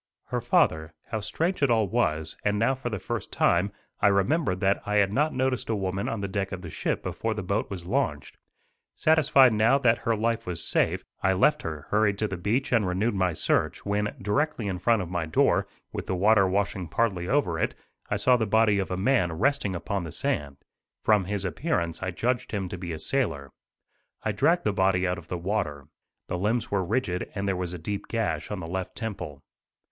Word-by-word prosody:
Her -, -, -1 dB
father. 80 Hz, 0 st, +2 dB, 0.2 s
How 110 Hz, -, -1 dB
strange 165 Hz, -, -2 dB
it 140 Hz, -, +4 dB
all 110 Hz, -3 st, +3 dB
was, 80 Hz, -8 st, 0 dB
and 105 Hz, 0 st, +1 dB
now 115 Hz, +5 st, +3 dB
for 130 Hz, -2 st, -4 dB
the 110 Hz, -, -3 dB
first -, -, -5 dB
time, 90 Hz, +4 st, +2 dB, 0.3 s
I -, -, +4 dB
remembered 100 Hz, -, +2 dB
that 100 Hz, 0 st, +2 dB
I 105 Hz, -, -2 dB
had 100 Hz, -1 st, +3 dB
not 150 Hz, +5 st, +2 dB
noticed 130 Hz, -4 st, -1 dB
a 110 Hz, -, +1 dB
woman 95 Hz, 0 st, -2 dB
on 115 Hz, -3 st, -3 dB
the 100 Hz, -, -2 dB
deck 100 Hz, 0 st, -2 dB
of 95 Hz, -1 st, -6 dB
the 85 Hz, -, -7 dB
ship -, -, -2 dB
before 110 Hz, -1 st, -2 dB
the 105 Hz, -, -4 dB
boat 100 Hz, +4 st, -1 dB
was 90 Hz, -4 st, -6 dB
launched. 95 Hz, -, -2 dB, 0.6 s
Satisfied 145 Hz, -5 st, +5 dB
now 110 Hz, +5 st, +4 dB
that 120 Hz, -5 st, +3 dB
her 115 Hz, +2 st, 0 dB
life 115 Hz, 0 st, -1 dB
was 90 Hz, -2 st, -2 dB
safe, -, -, +1 dB, 0.2 s
I 95 Hz, -, +3 dB
left 125 Hz, +11 st, +3 dB
her, 80 Hz, -3 st, -5 dB
hurried 105 Hz, -1 st, +3 dB
to 110 Hz, -, 0 dB
the 95 Hz, -, -4 dB
beach 110 Hz, +10 st, -1 dB
and 110 Hz, -5 st, +3 dB
renewed 100 Hz, +6 st, 0 dB
my 95 Hz, -3 st, +1 dB
search, -, -, 0 dB
when, 105 Hz, +1 st, -1 dB
directly 125 Hz, +4 st, 0 dB
in 95 Hz, -2 st, -2 dB
front 115 Hz, 0 st, +2 dB
of 85 Hz, -, -8 dB
my 85 Hz, -3 st, -1 dB
door, 80 Hz, -, +2 dB, 0.3 s
with -, -, -5 dB
the 95 Hz, -, 0 dB
water 100 Hz, +1 st, +4 dB
washing 95 Hz, -1 st, -1 dB
partly 95 Hz, -1 st, 0 dB
over 95 Hz, -, +1 dB
it, -, -, 0 dB, 0.3 s
I -, -, +1 dB
saw 125 Hz, +5 st, +4 dB
the 110 Hz, -2 st, -1 dB
body 105 Hz, -1 st, +3 dB
of 95 Hz, -, -2 dB
a 90 Hz, -, -2 dB
man 95 Hz, -4 st, +2 dB
resting 110 Hz, -, +1 dB
upon 95 Hz, +2 st, -3 dB
the 80 Hz, -, -6 dB
sand. 70 Hz, -2 st, -2 dB, 0.5 s
From 105 Hz, -3 st, +3 dB
his 100 Hz, 0 st, -2 dB
appearance 85 Hz, -, -1 dB
I 95 Hz, -, -2 dB
judged 120 Hz, +8 st, -1 dB
him 100 Hz, -3 st, -1 dB
to 90 Hz, -, -5 dB
be 85 Hz, -1 st, -5 dB
a 80 Hz, -, -4 dB
sailor. 80 Hz, -, -1 dB, 0.7 s
I 110 Hz, -, 0 dB
dragged 170 Hz, -, +2 dB
the 105 Hz, -, +1 dB
body 95 Hz, -1 st, +2 dB
out 90 Hz, 0 st, -1 dB
of 80 Hz, -, -15 dB
the 90 Hz, -, -3 dB
water. 85 Hz, -6 st, -2 dB, 0.4 s
The 90 Hz, -, -3 dB
limbs 110 Hz, +5 st, 0 dB
were 100 Hz, -2 st, +1 dB
rigid 95 Hz, -2 st, -1 dB
and 100 Hz, 0 st, -2 dB
there 95 Hz, -, +1 dB
was 90 Hz, -1 st, -3 dB
a -, -, -4 dB
deep 100 Hz, +5 st, -5 dB
gash 105 Hz, -10 st, -2 dB
on 105 Hz, -3 st, -4 dB
the -, -, -5 dB
left 95 Hz, +2 st, -4 dB
temple. 90 Hz, -, -6 dB
100 Hz, 215 wpm, -27 LUFS, 90-115 Hz, 0.7 s, Satisfied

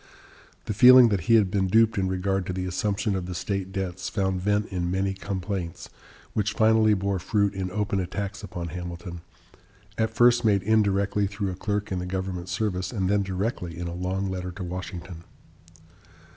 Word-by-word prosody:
The -, -, -2 dB
feeling 125 Hz, +2 st, +8 dB
that 100 Hz, -6 st, -1 dB
he 115 Hz, -, +7 dB
had 100 Hz, -4 st, +4 dB
been 95 Hz, -1 st, +1 dB
duped 115 Hz, +3 st, +4 dB
in 95 Hz, -1 st, 0 dB
regard 95 Hz, 0 st, -1 dB
to 95 Hz, -, -2 dB
the 90 Hz, 0 st, -3 dB
assumption 100 Hz, +3 st, -1 dB
of 90 Hz, -2 st, -3 dB
the 90 Hz, -, -5 dB
state 95 Hz, +1 st, -3 dB
debts 95 Hz, -1 st, -4 dB
found 95 Hz, -3 st, -1 dB
vent 105 Hz, +2 st, +1 dB
in 90 Hz, -2 st, -2 dB
many 95 Hz, +1 st, 0 dB
complaints, 95 Hz, -3 st, -5 dB, 0.4 s
which 105 Hz, -1 st, 0 dB
finally 110 Hz, -1 st, +4 dB
bore 100 Hz, 0 st, -1 dB
fruit 100 Hz, +2 st, +1 dB
in 95 Hz, -1 st, -3 dB
open 100 Hz, 0 st, -1 dB
attacks 100 Hz, +1 st, -4 dB
upon 90 Hz, -4 st, -6 dB
Hamilton, 85 Hz, -1 st, -7 dB, 0.8 s
at 110 Hz, 0 st, +2 dB
first 120 Hz, +2 st, +4 dB
made 100 Hz, -4 st, +3 dB
indirectly 100 Hz, -1 st, +2 dB
through 100 Hz, -1 st, -3 dB
a -, -, -6 dB
clerk 105 Hz, +2 st, -3 dB
in 95 Hz, -, -1 dB
the 90 Hz, -, -4 dB
government 95 Hz, -1 st, -4 dB
service, 95 Hz, -1 st, -2 dB
and 95 Hz, -6 st, -1 dB
then 100 Hz, 0 st, +3 dB
directly 95 Hz, -3 st, -3 dB
in 85 Hz, -, -4 dB
a 85 Hz, -, -5 dB
long 95 Hz, +2 st, -2 dB
letter 90 Hz, -1 st, -4 dB
to 95 Hz, +1 st, -6 dB
Washington. 90 Hz, -1 st, -7 dB
95 Hz, 185 wpm, -26 LUFS, 90-105 Hz, 0.8 s, feeling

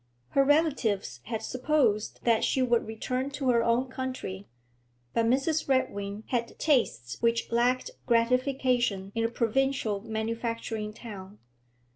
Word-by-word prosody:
Her 275 Hz, -, +4 dB
relatives 270 Hz, -, +1 dB
had 225 Hz, -1 st, -4 dB
supposed 255 Hz, -5 st, +1 dB
that 230 Hz, -2 st, +3 dB
she -, -, +1 dB
would 240 Hz, -3 st, +2 dB
return 255 Hz, +4 st, -2 dB
to 275 Hz, -2 st, -1 dB
her 235 Hz, -1 st, +3 dB
own 235 Hz, +3 st, +2 dB
country, 255 Hz, -7 st, -5 dB, 0.7 s
but 230 Hz, 0 st, +2 dB
Mrs. 275 Hz, +5 st, +1 dB
Redwing 205 Hz, -5 st, 0 dB
had 235 Hz, -2 st, -2 dB
tastes 180 Hz, -, +1 dB
which 230 Hz, 0 st, +1 dB
lacked 250 Hz, -, +2 dB, 0.2 s
gratification 240 Hz, -4 st, +1 dB
in 230 Hz, -, 0 dB
a 230 Hz, -, +2 dB
provincial 235 Hz, -2 st, 0 dB
manufacturing 225 Hz, 0 st, -3 dB
town. 210 Hz, -3 st, -10 dB
235 Hz, 125 wpm, -28 LUFS, 220-260 Hz, 0.7 s, Her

